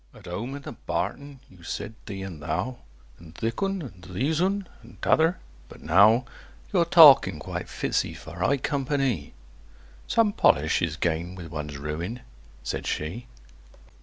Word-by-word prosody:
"At -, -, -15 dB
home 105 Hz, +10 st, -5 dB
in 140 Hz, -, -9 dB
the -, -, -7 dB
barton 140 Hz, -2 st, -4 dB
you 90 Hz, -2 st, -18 dB
said 85 Hz, +5 st, -5 dB
`thee' 95 Hz, -2 st, -5 dB
and 85 Hz, -6 st, -8 dB
`thou,' 115 Hz, -, -2 dB, 0.4 s
And 85 Hz, -1 st, -14 dB
`thik 115 Hz, +3 st, -3 dB
oon,' 195 Hz, -2 st, -1 dB
and 90 Hz, -10 st, -11 dB
`theäs 130 Hz, -, -1 dB
oon,' 195 Hz, +1 st, 0 dB
and 115 Hz, +2 st, -16 dB
`t'other'; 165 Hz, +3 st, +3 dB, 0.3 s
but -, -, -13 dB
now 105 Hz, +9 st, +5 dB, 0.5 s
Your -, -, +4 dB
talking -, -, +8 dB
quite -, -, -6 dB
fits -, -, 0 dB
'ee -, -, -7 dB
for 85 Hz, +2 st, -11 dB
high 140 Hz, +10 st, +2 dB
compa 140 Hz, +1 st, -1 dB
ny!" 120 Hz, -, -1 dB, 0.7 s
"Some 225 Hz, -3 st, +3 dB
polish 80 Hz, -, +3 dB
is 85 Hz, -2 st, -1 dB
gained 85 Hz, +2 st, -2 dB
with 85 Hz, -3 st, -9 dB
one's 75 Hz, -1 st, -5 dB
ruin," 80 Hz, -, -4 dB, 0.4 s
said -, -, -4 dB
she. 85 Hz, +11 st, -3 dB
100 Hz, 165 wpm, -26 LUFS, 85-140 Hz, 0.7 s, talking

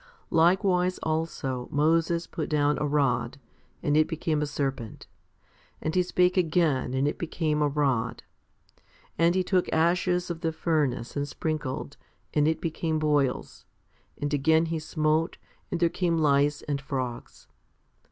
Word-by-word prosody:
Likewise 180 Hz, +2 st, +3 dB
also 155 Hz, -6 st, -2 dB
Moses 165 Hz, +3 st, +2 dB
put 155 Hz, -, -5 dB
down 150 Hz, -1 st, +2 dB
a 150 Hz, -, 0 dB
rod, 140 Hz, -3 st, 0 dB, 0.4 s
and 145 Hz, -, +1 dB
it 155 Hz, 0 st, +4 dB
became 160 Hz, -2 st, -1 dB
a 150 Hz, -, 0 dB
serpent, 135 Hz, -6 st, -4 dB, 0.7 s
and 155 Hz, -, -2 dB
he 185 Hz, -, +3 dB
spake 180 Hz, +1 st, +2 dB
again 160 Hz, -7 st, +1 dB
and 135 Hz, +2 st, +1 dB
it 145 Hz, -, -3 dB
became 155 Hz, -2 st, -1 dB
a 150 Hz, -, +3 dB
rod; 135 Hz, -5 st, 0 dB, 1.0 s
and 170 Hz, +1 st, +4 dB
he 185 Hz, -, +2 dB
took 180 Hz, -1 st, +1 dB
ashes 175 Hz, +2 st, +1 dB
of 165 Hz, -1 st, -6 dB
the 165 Hz, -, 0 dB
furnace 150 Hz, -7 st, -1 dB
and 145 Hz, 0 st, -1 dB
sprinkled, 145 Hz, -3 st, -4 dB, 0.4 s
and 150 Hz, 0 st, +3 dB
it 160 Hz, 0 st, +1 dB
became 160 Hz, -1 st, -2 dB
boils; 145 Hz, -4 st, 0 dB, 0.5 s
and 145 Hz, 0 st, -2 dB
again 160 Hz, +3 st, +3 dB
he 165 Hz, 0 st, -2 dB
smote, 155 Hz, +1 st, 0 dB, 0.3 s
and 175 Hz, -, -2 dB
there 170 Hz, -, +5 dB
came 170 Hz, 0 st, 0 dB
lice 145 Hz, -1 st, +2 dB
and 140 Hz, -2 st, -2 dB
frogs. 130 Hz, -3 st, -5 dB
155 Hz, 145 wpm, -27 LUFS, 145-165 Hz, 1.0 s, there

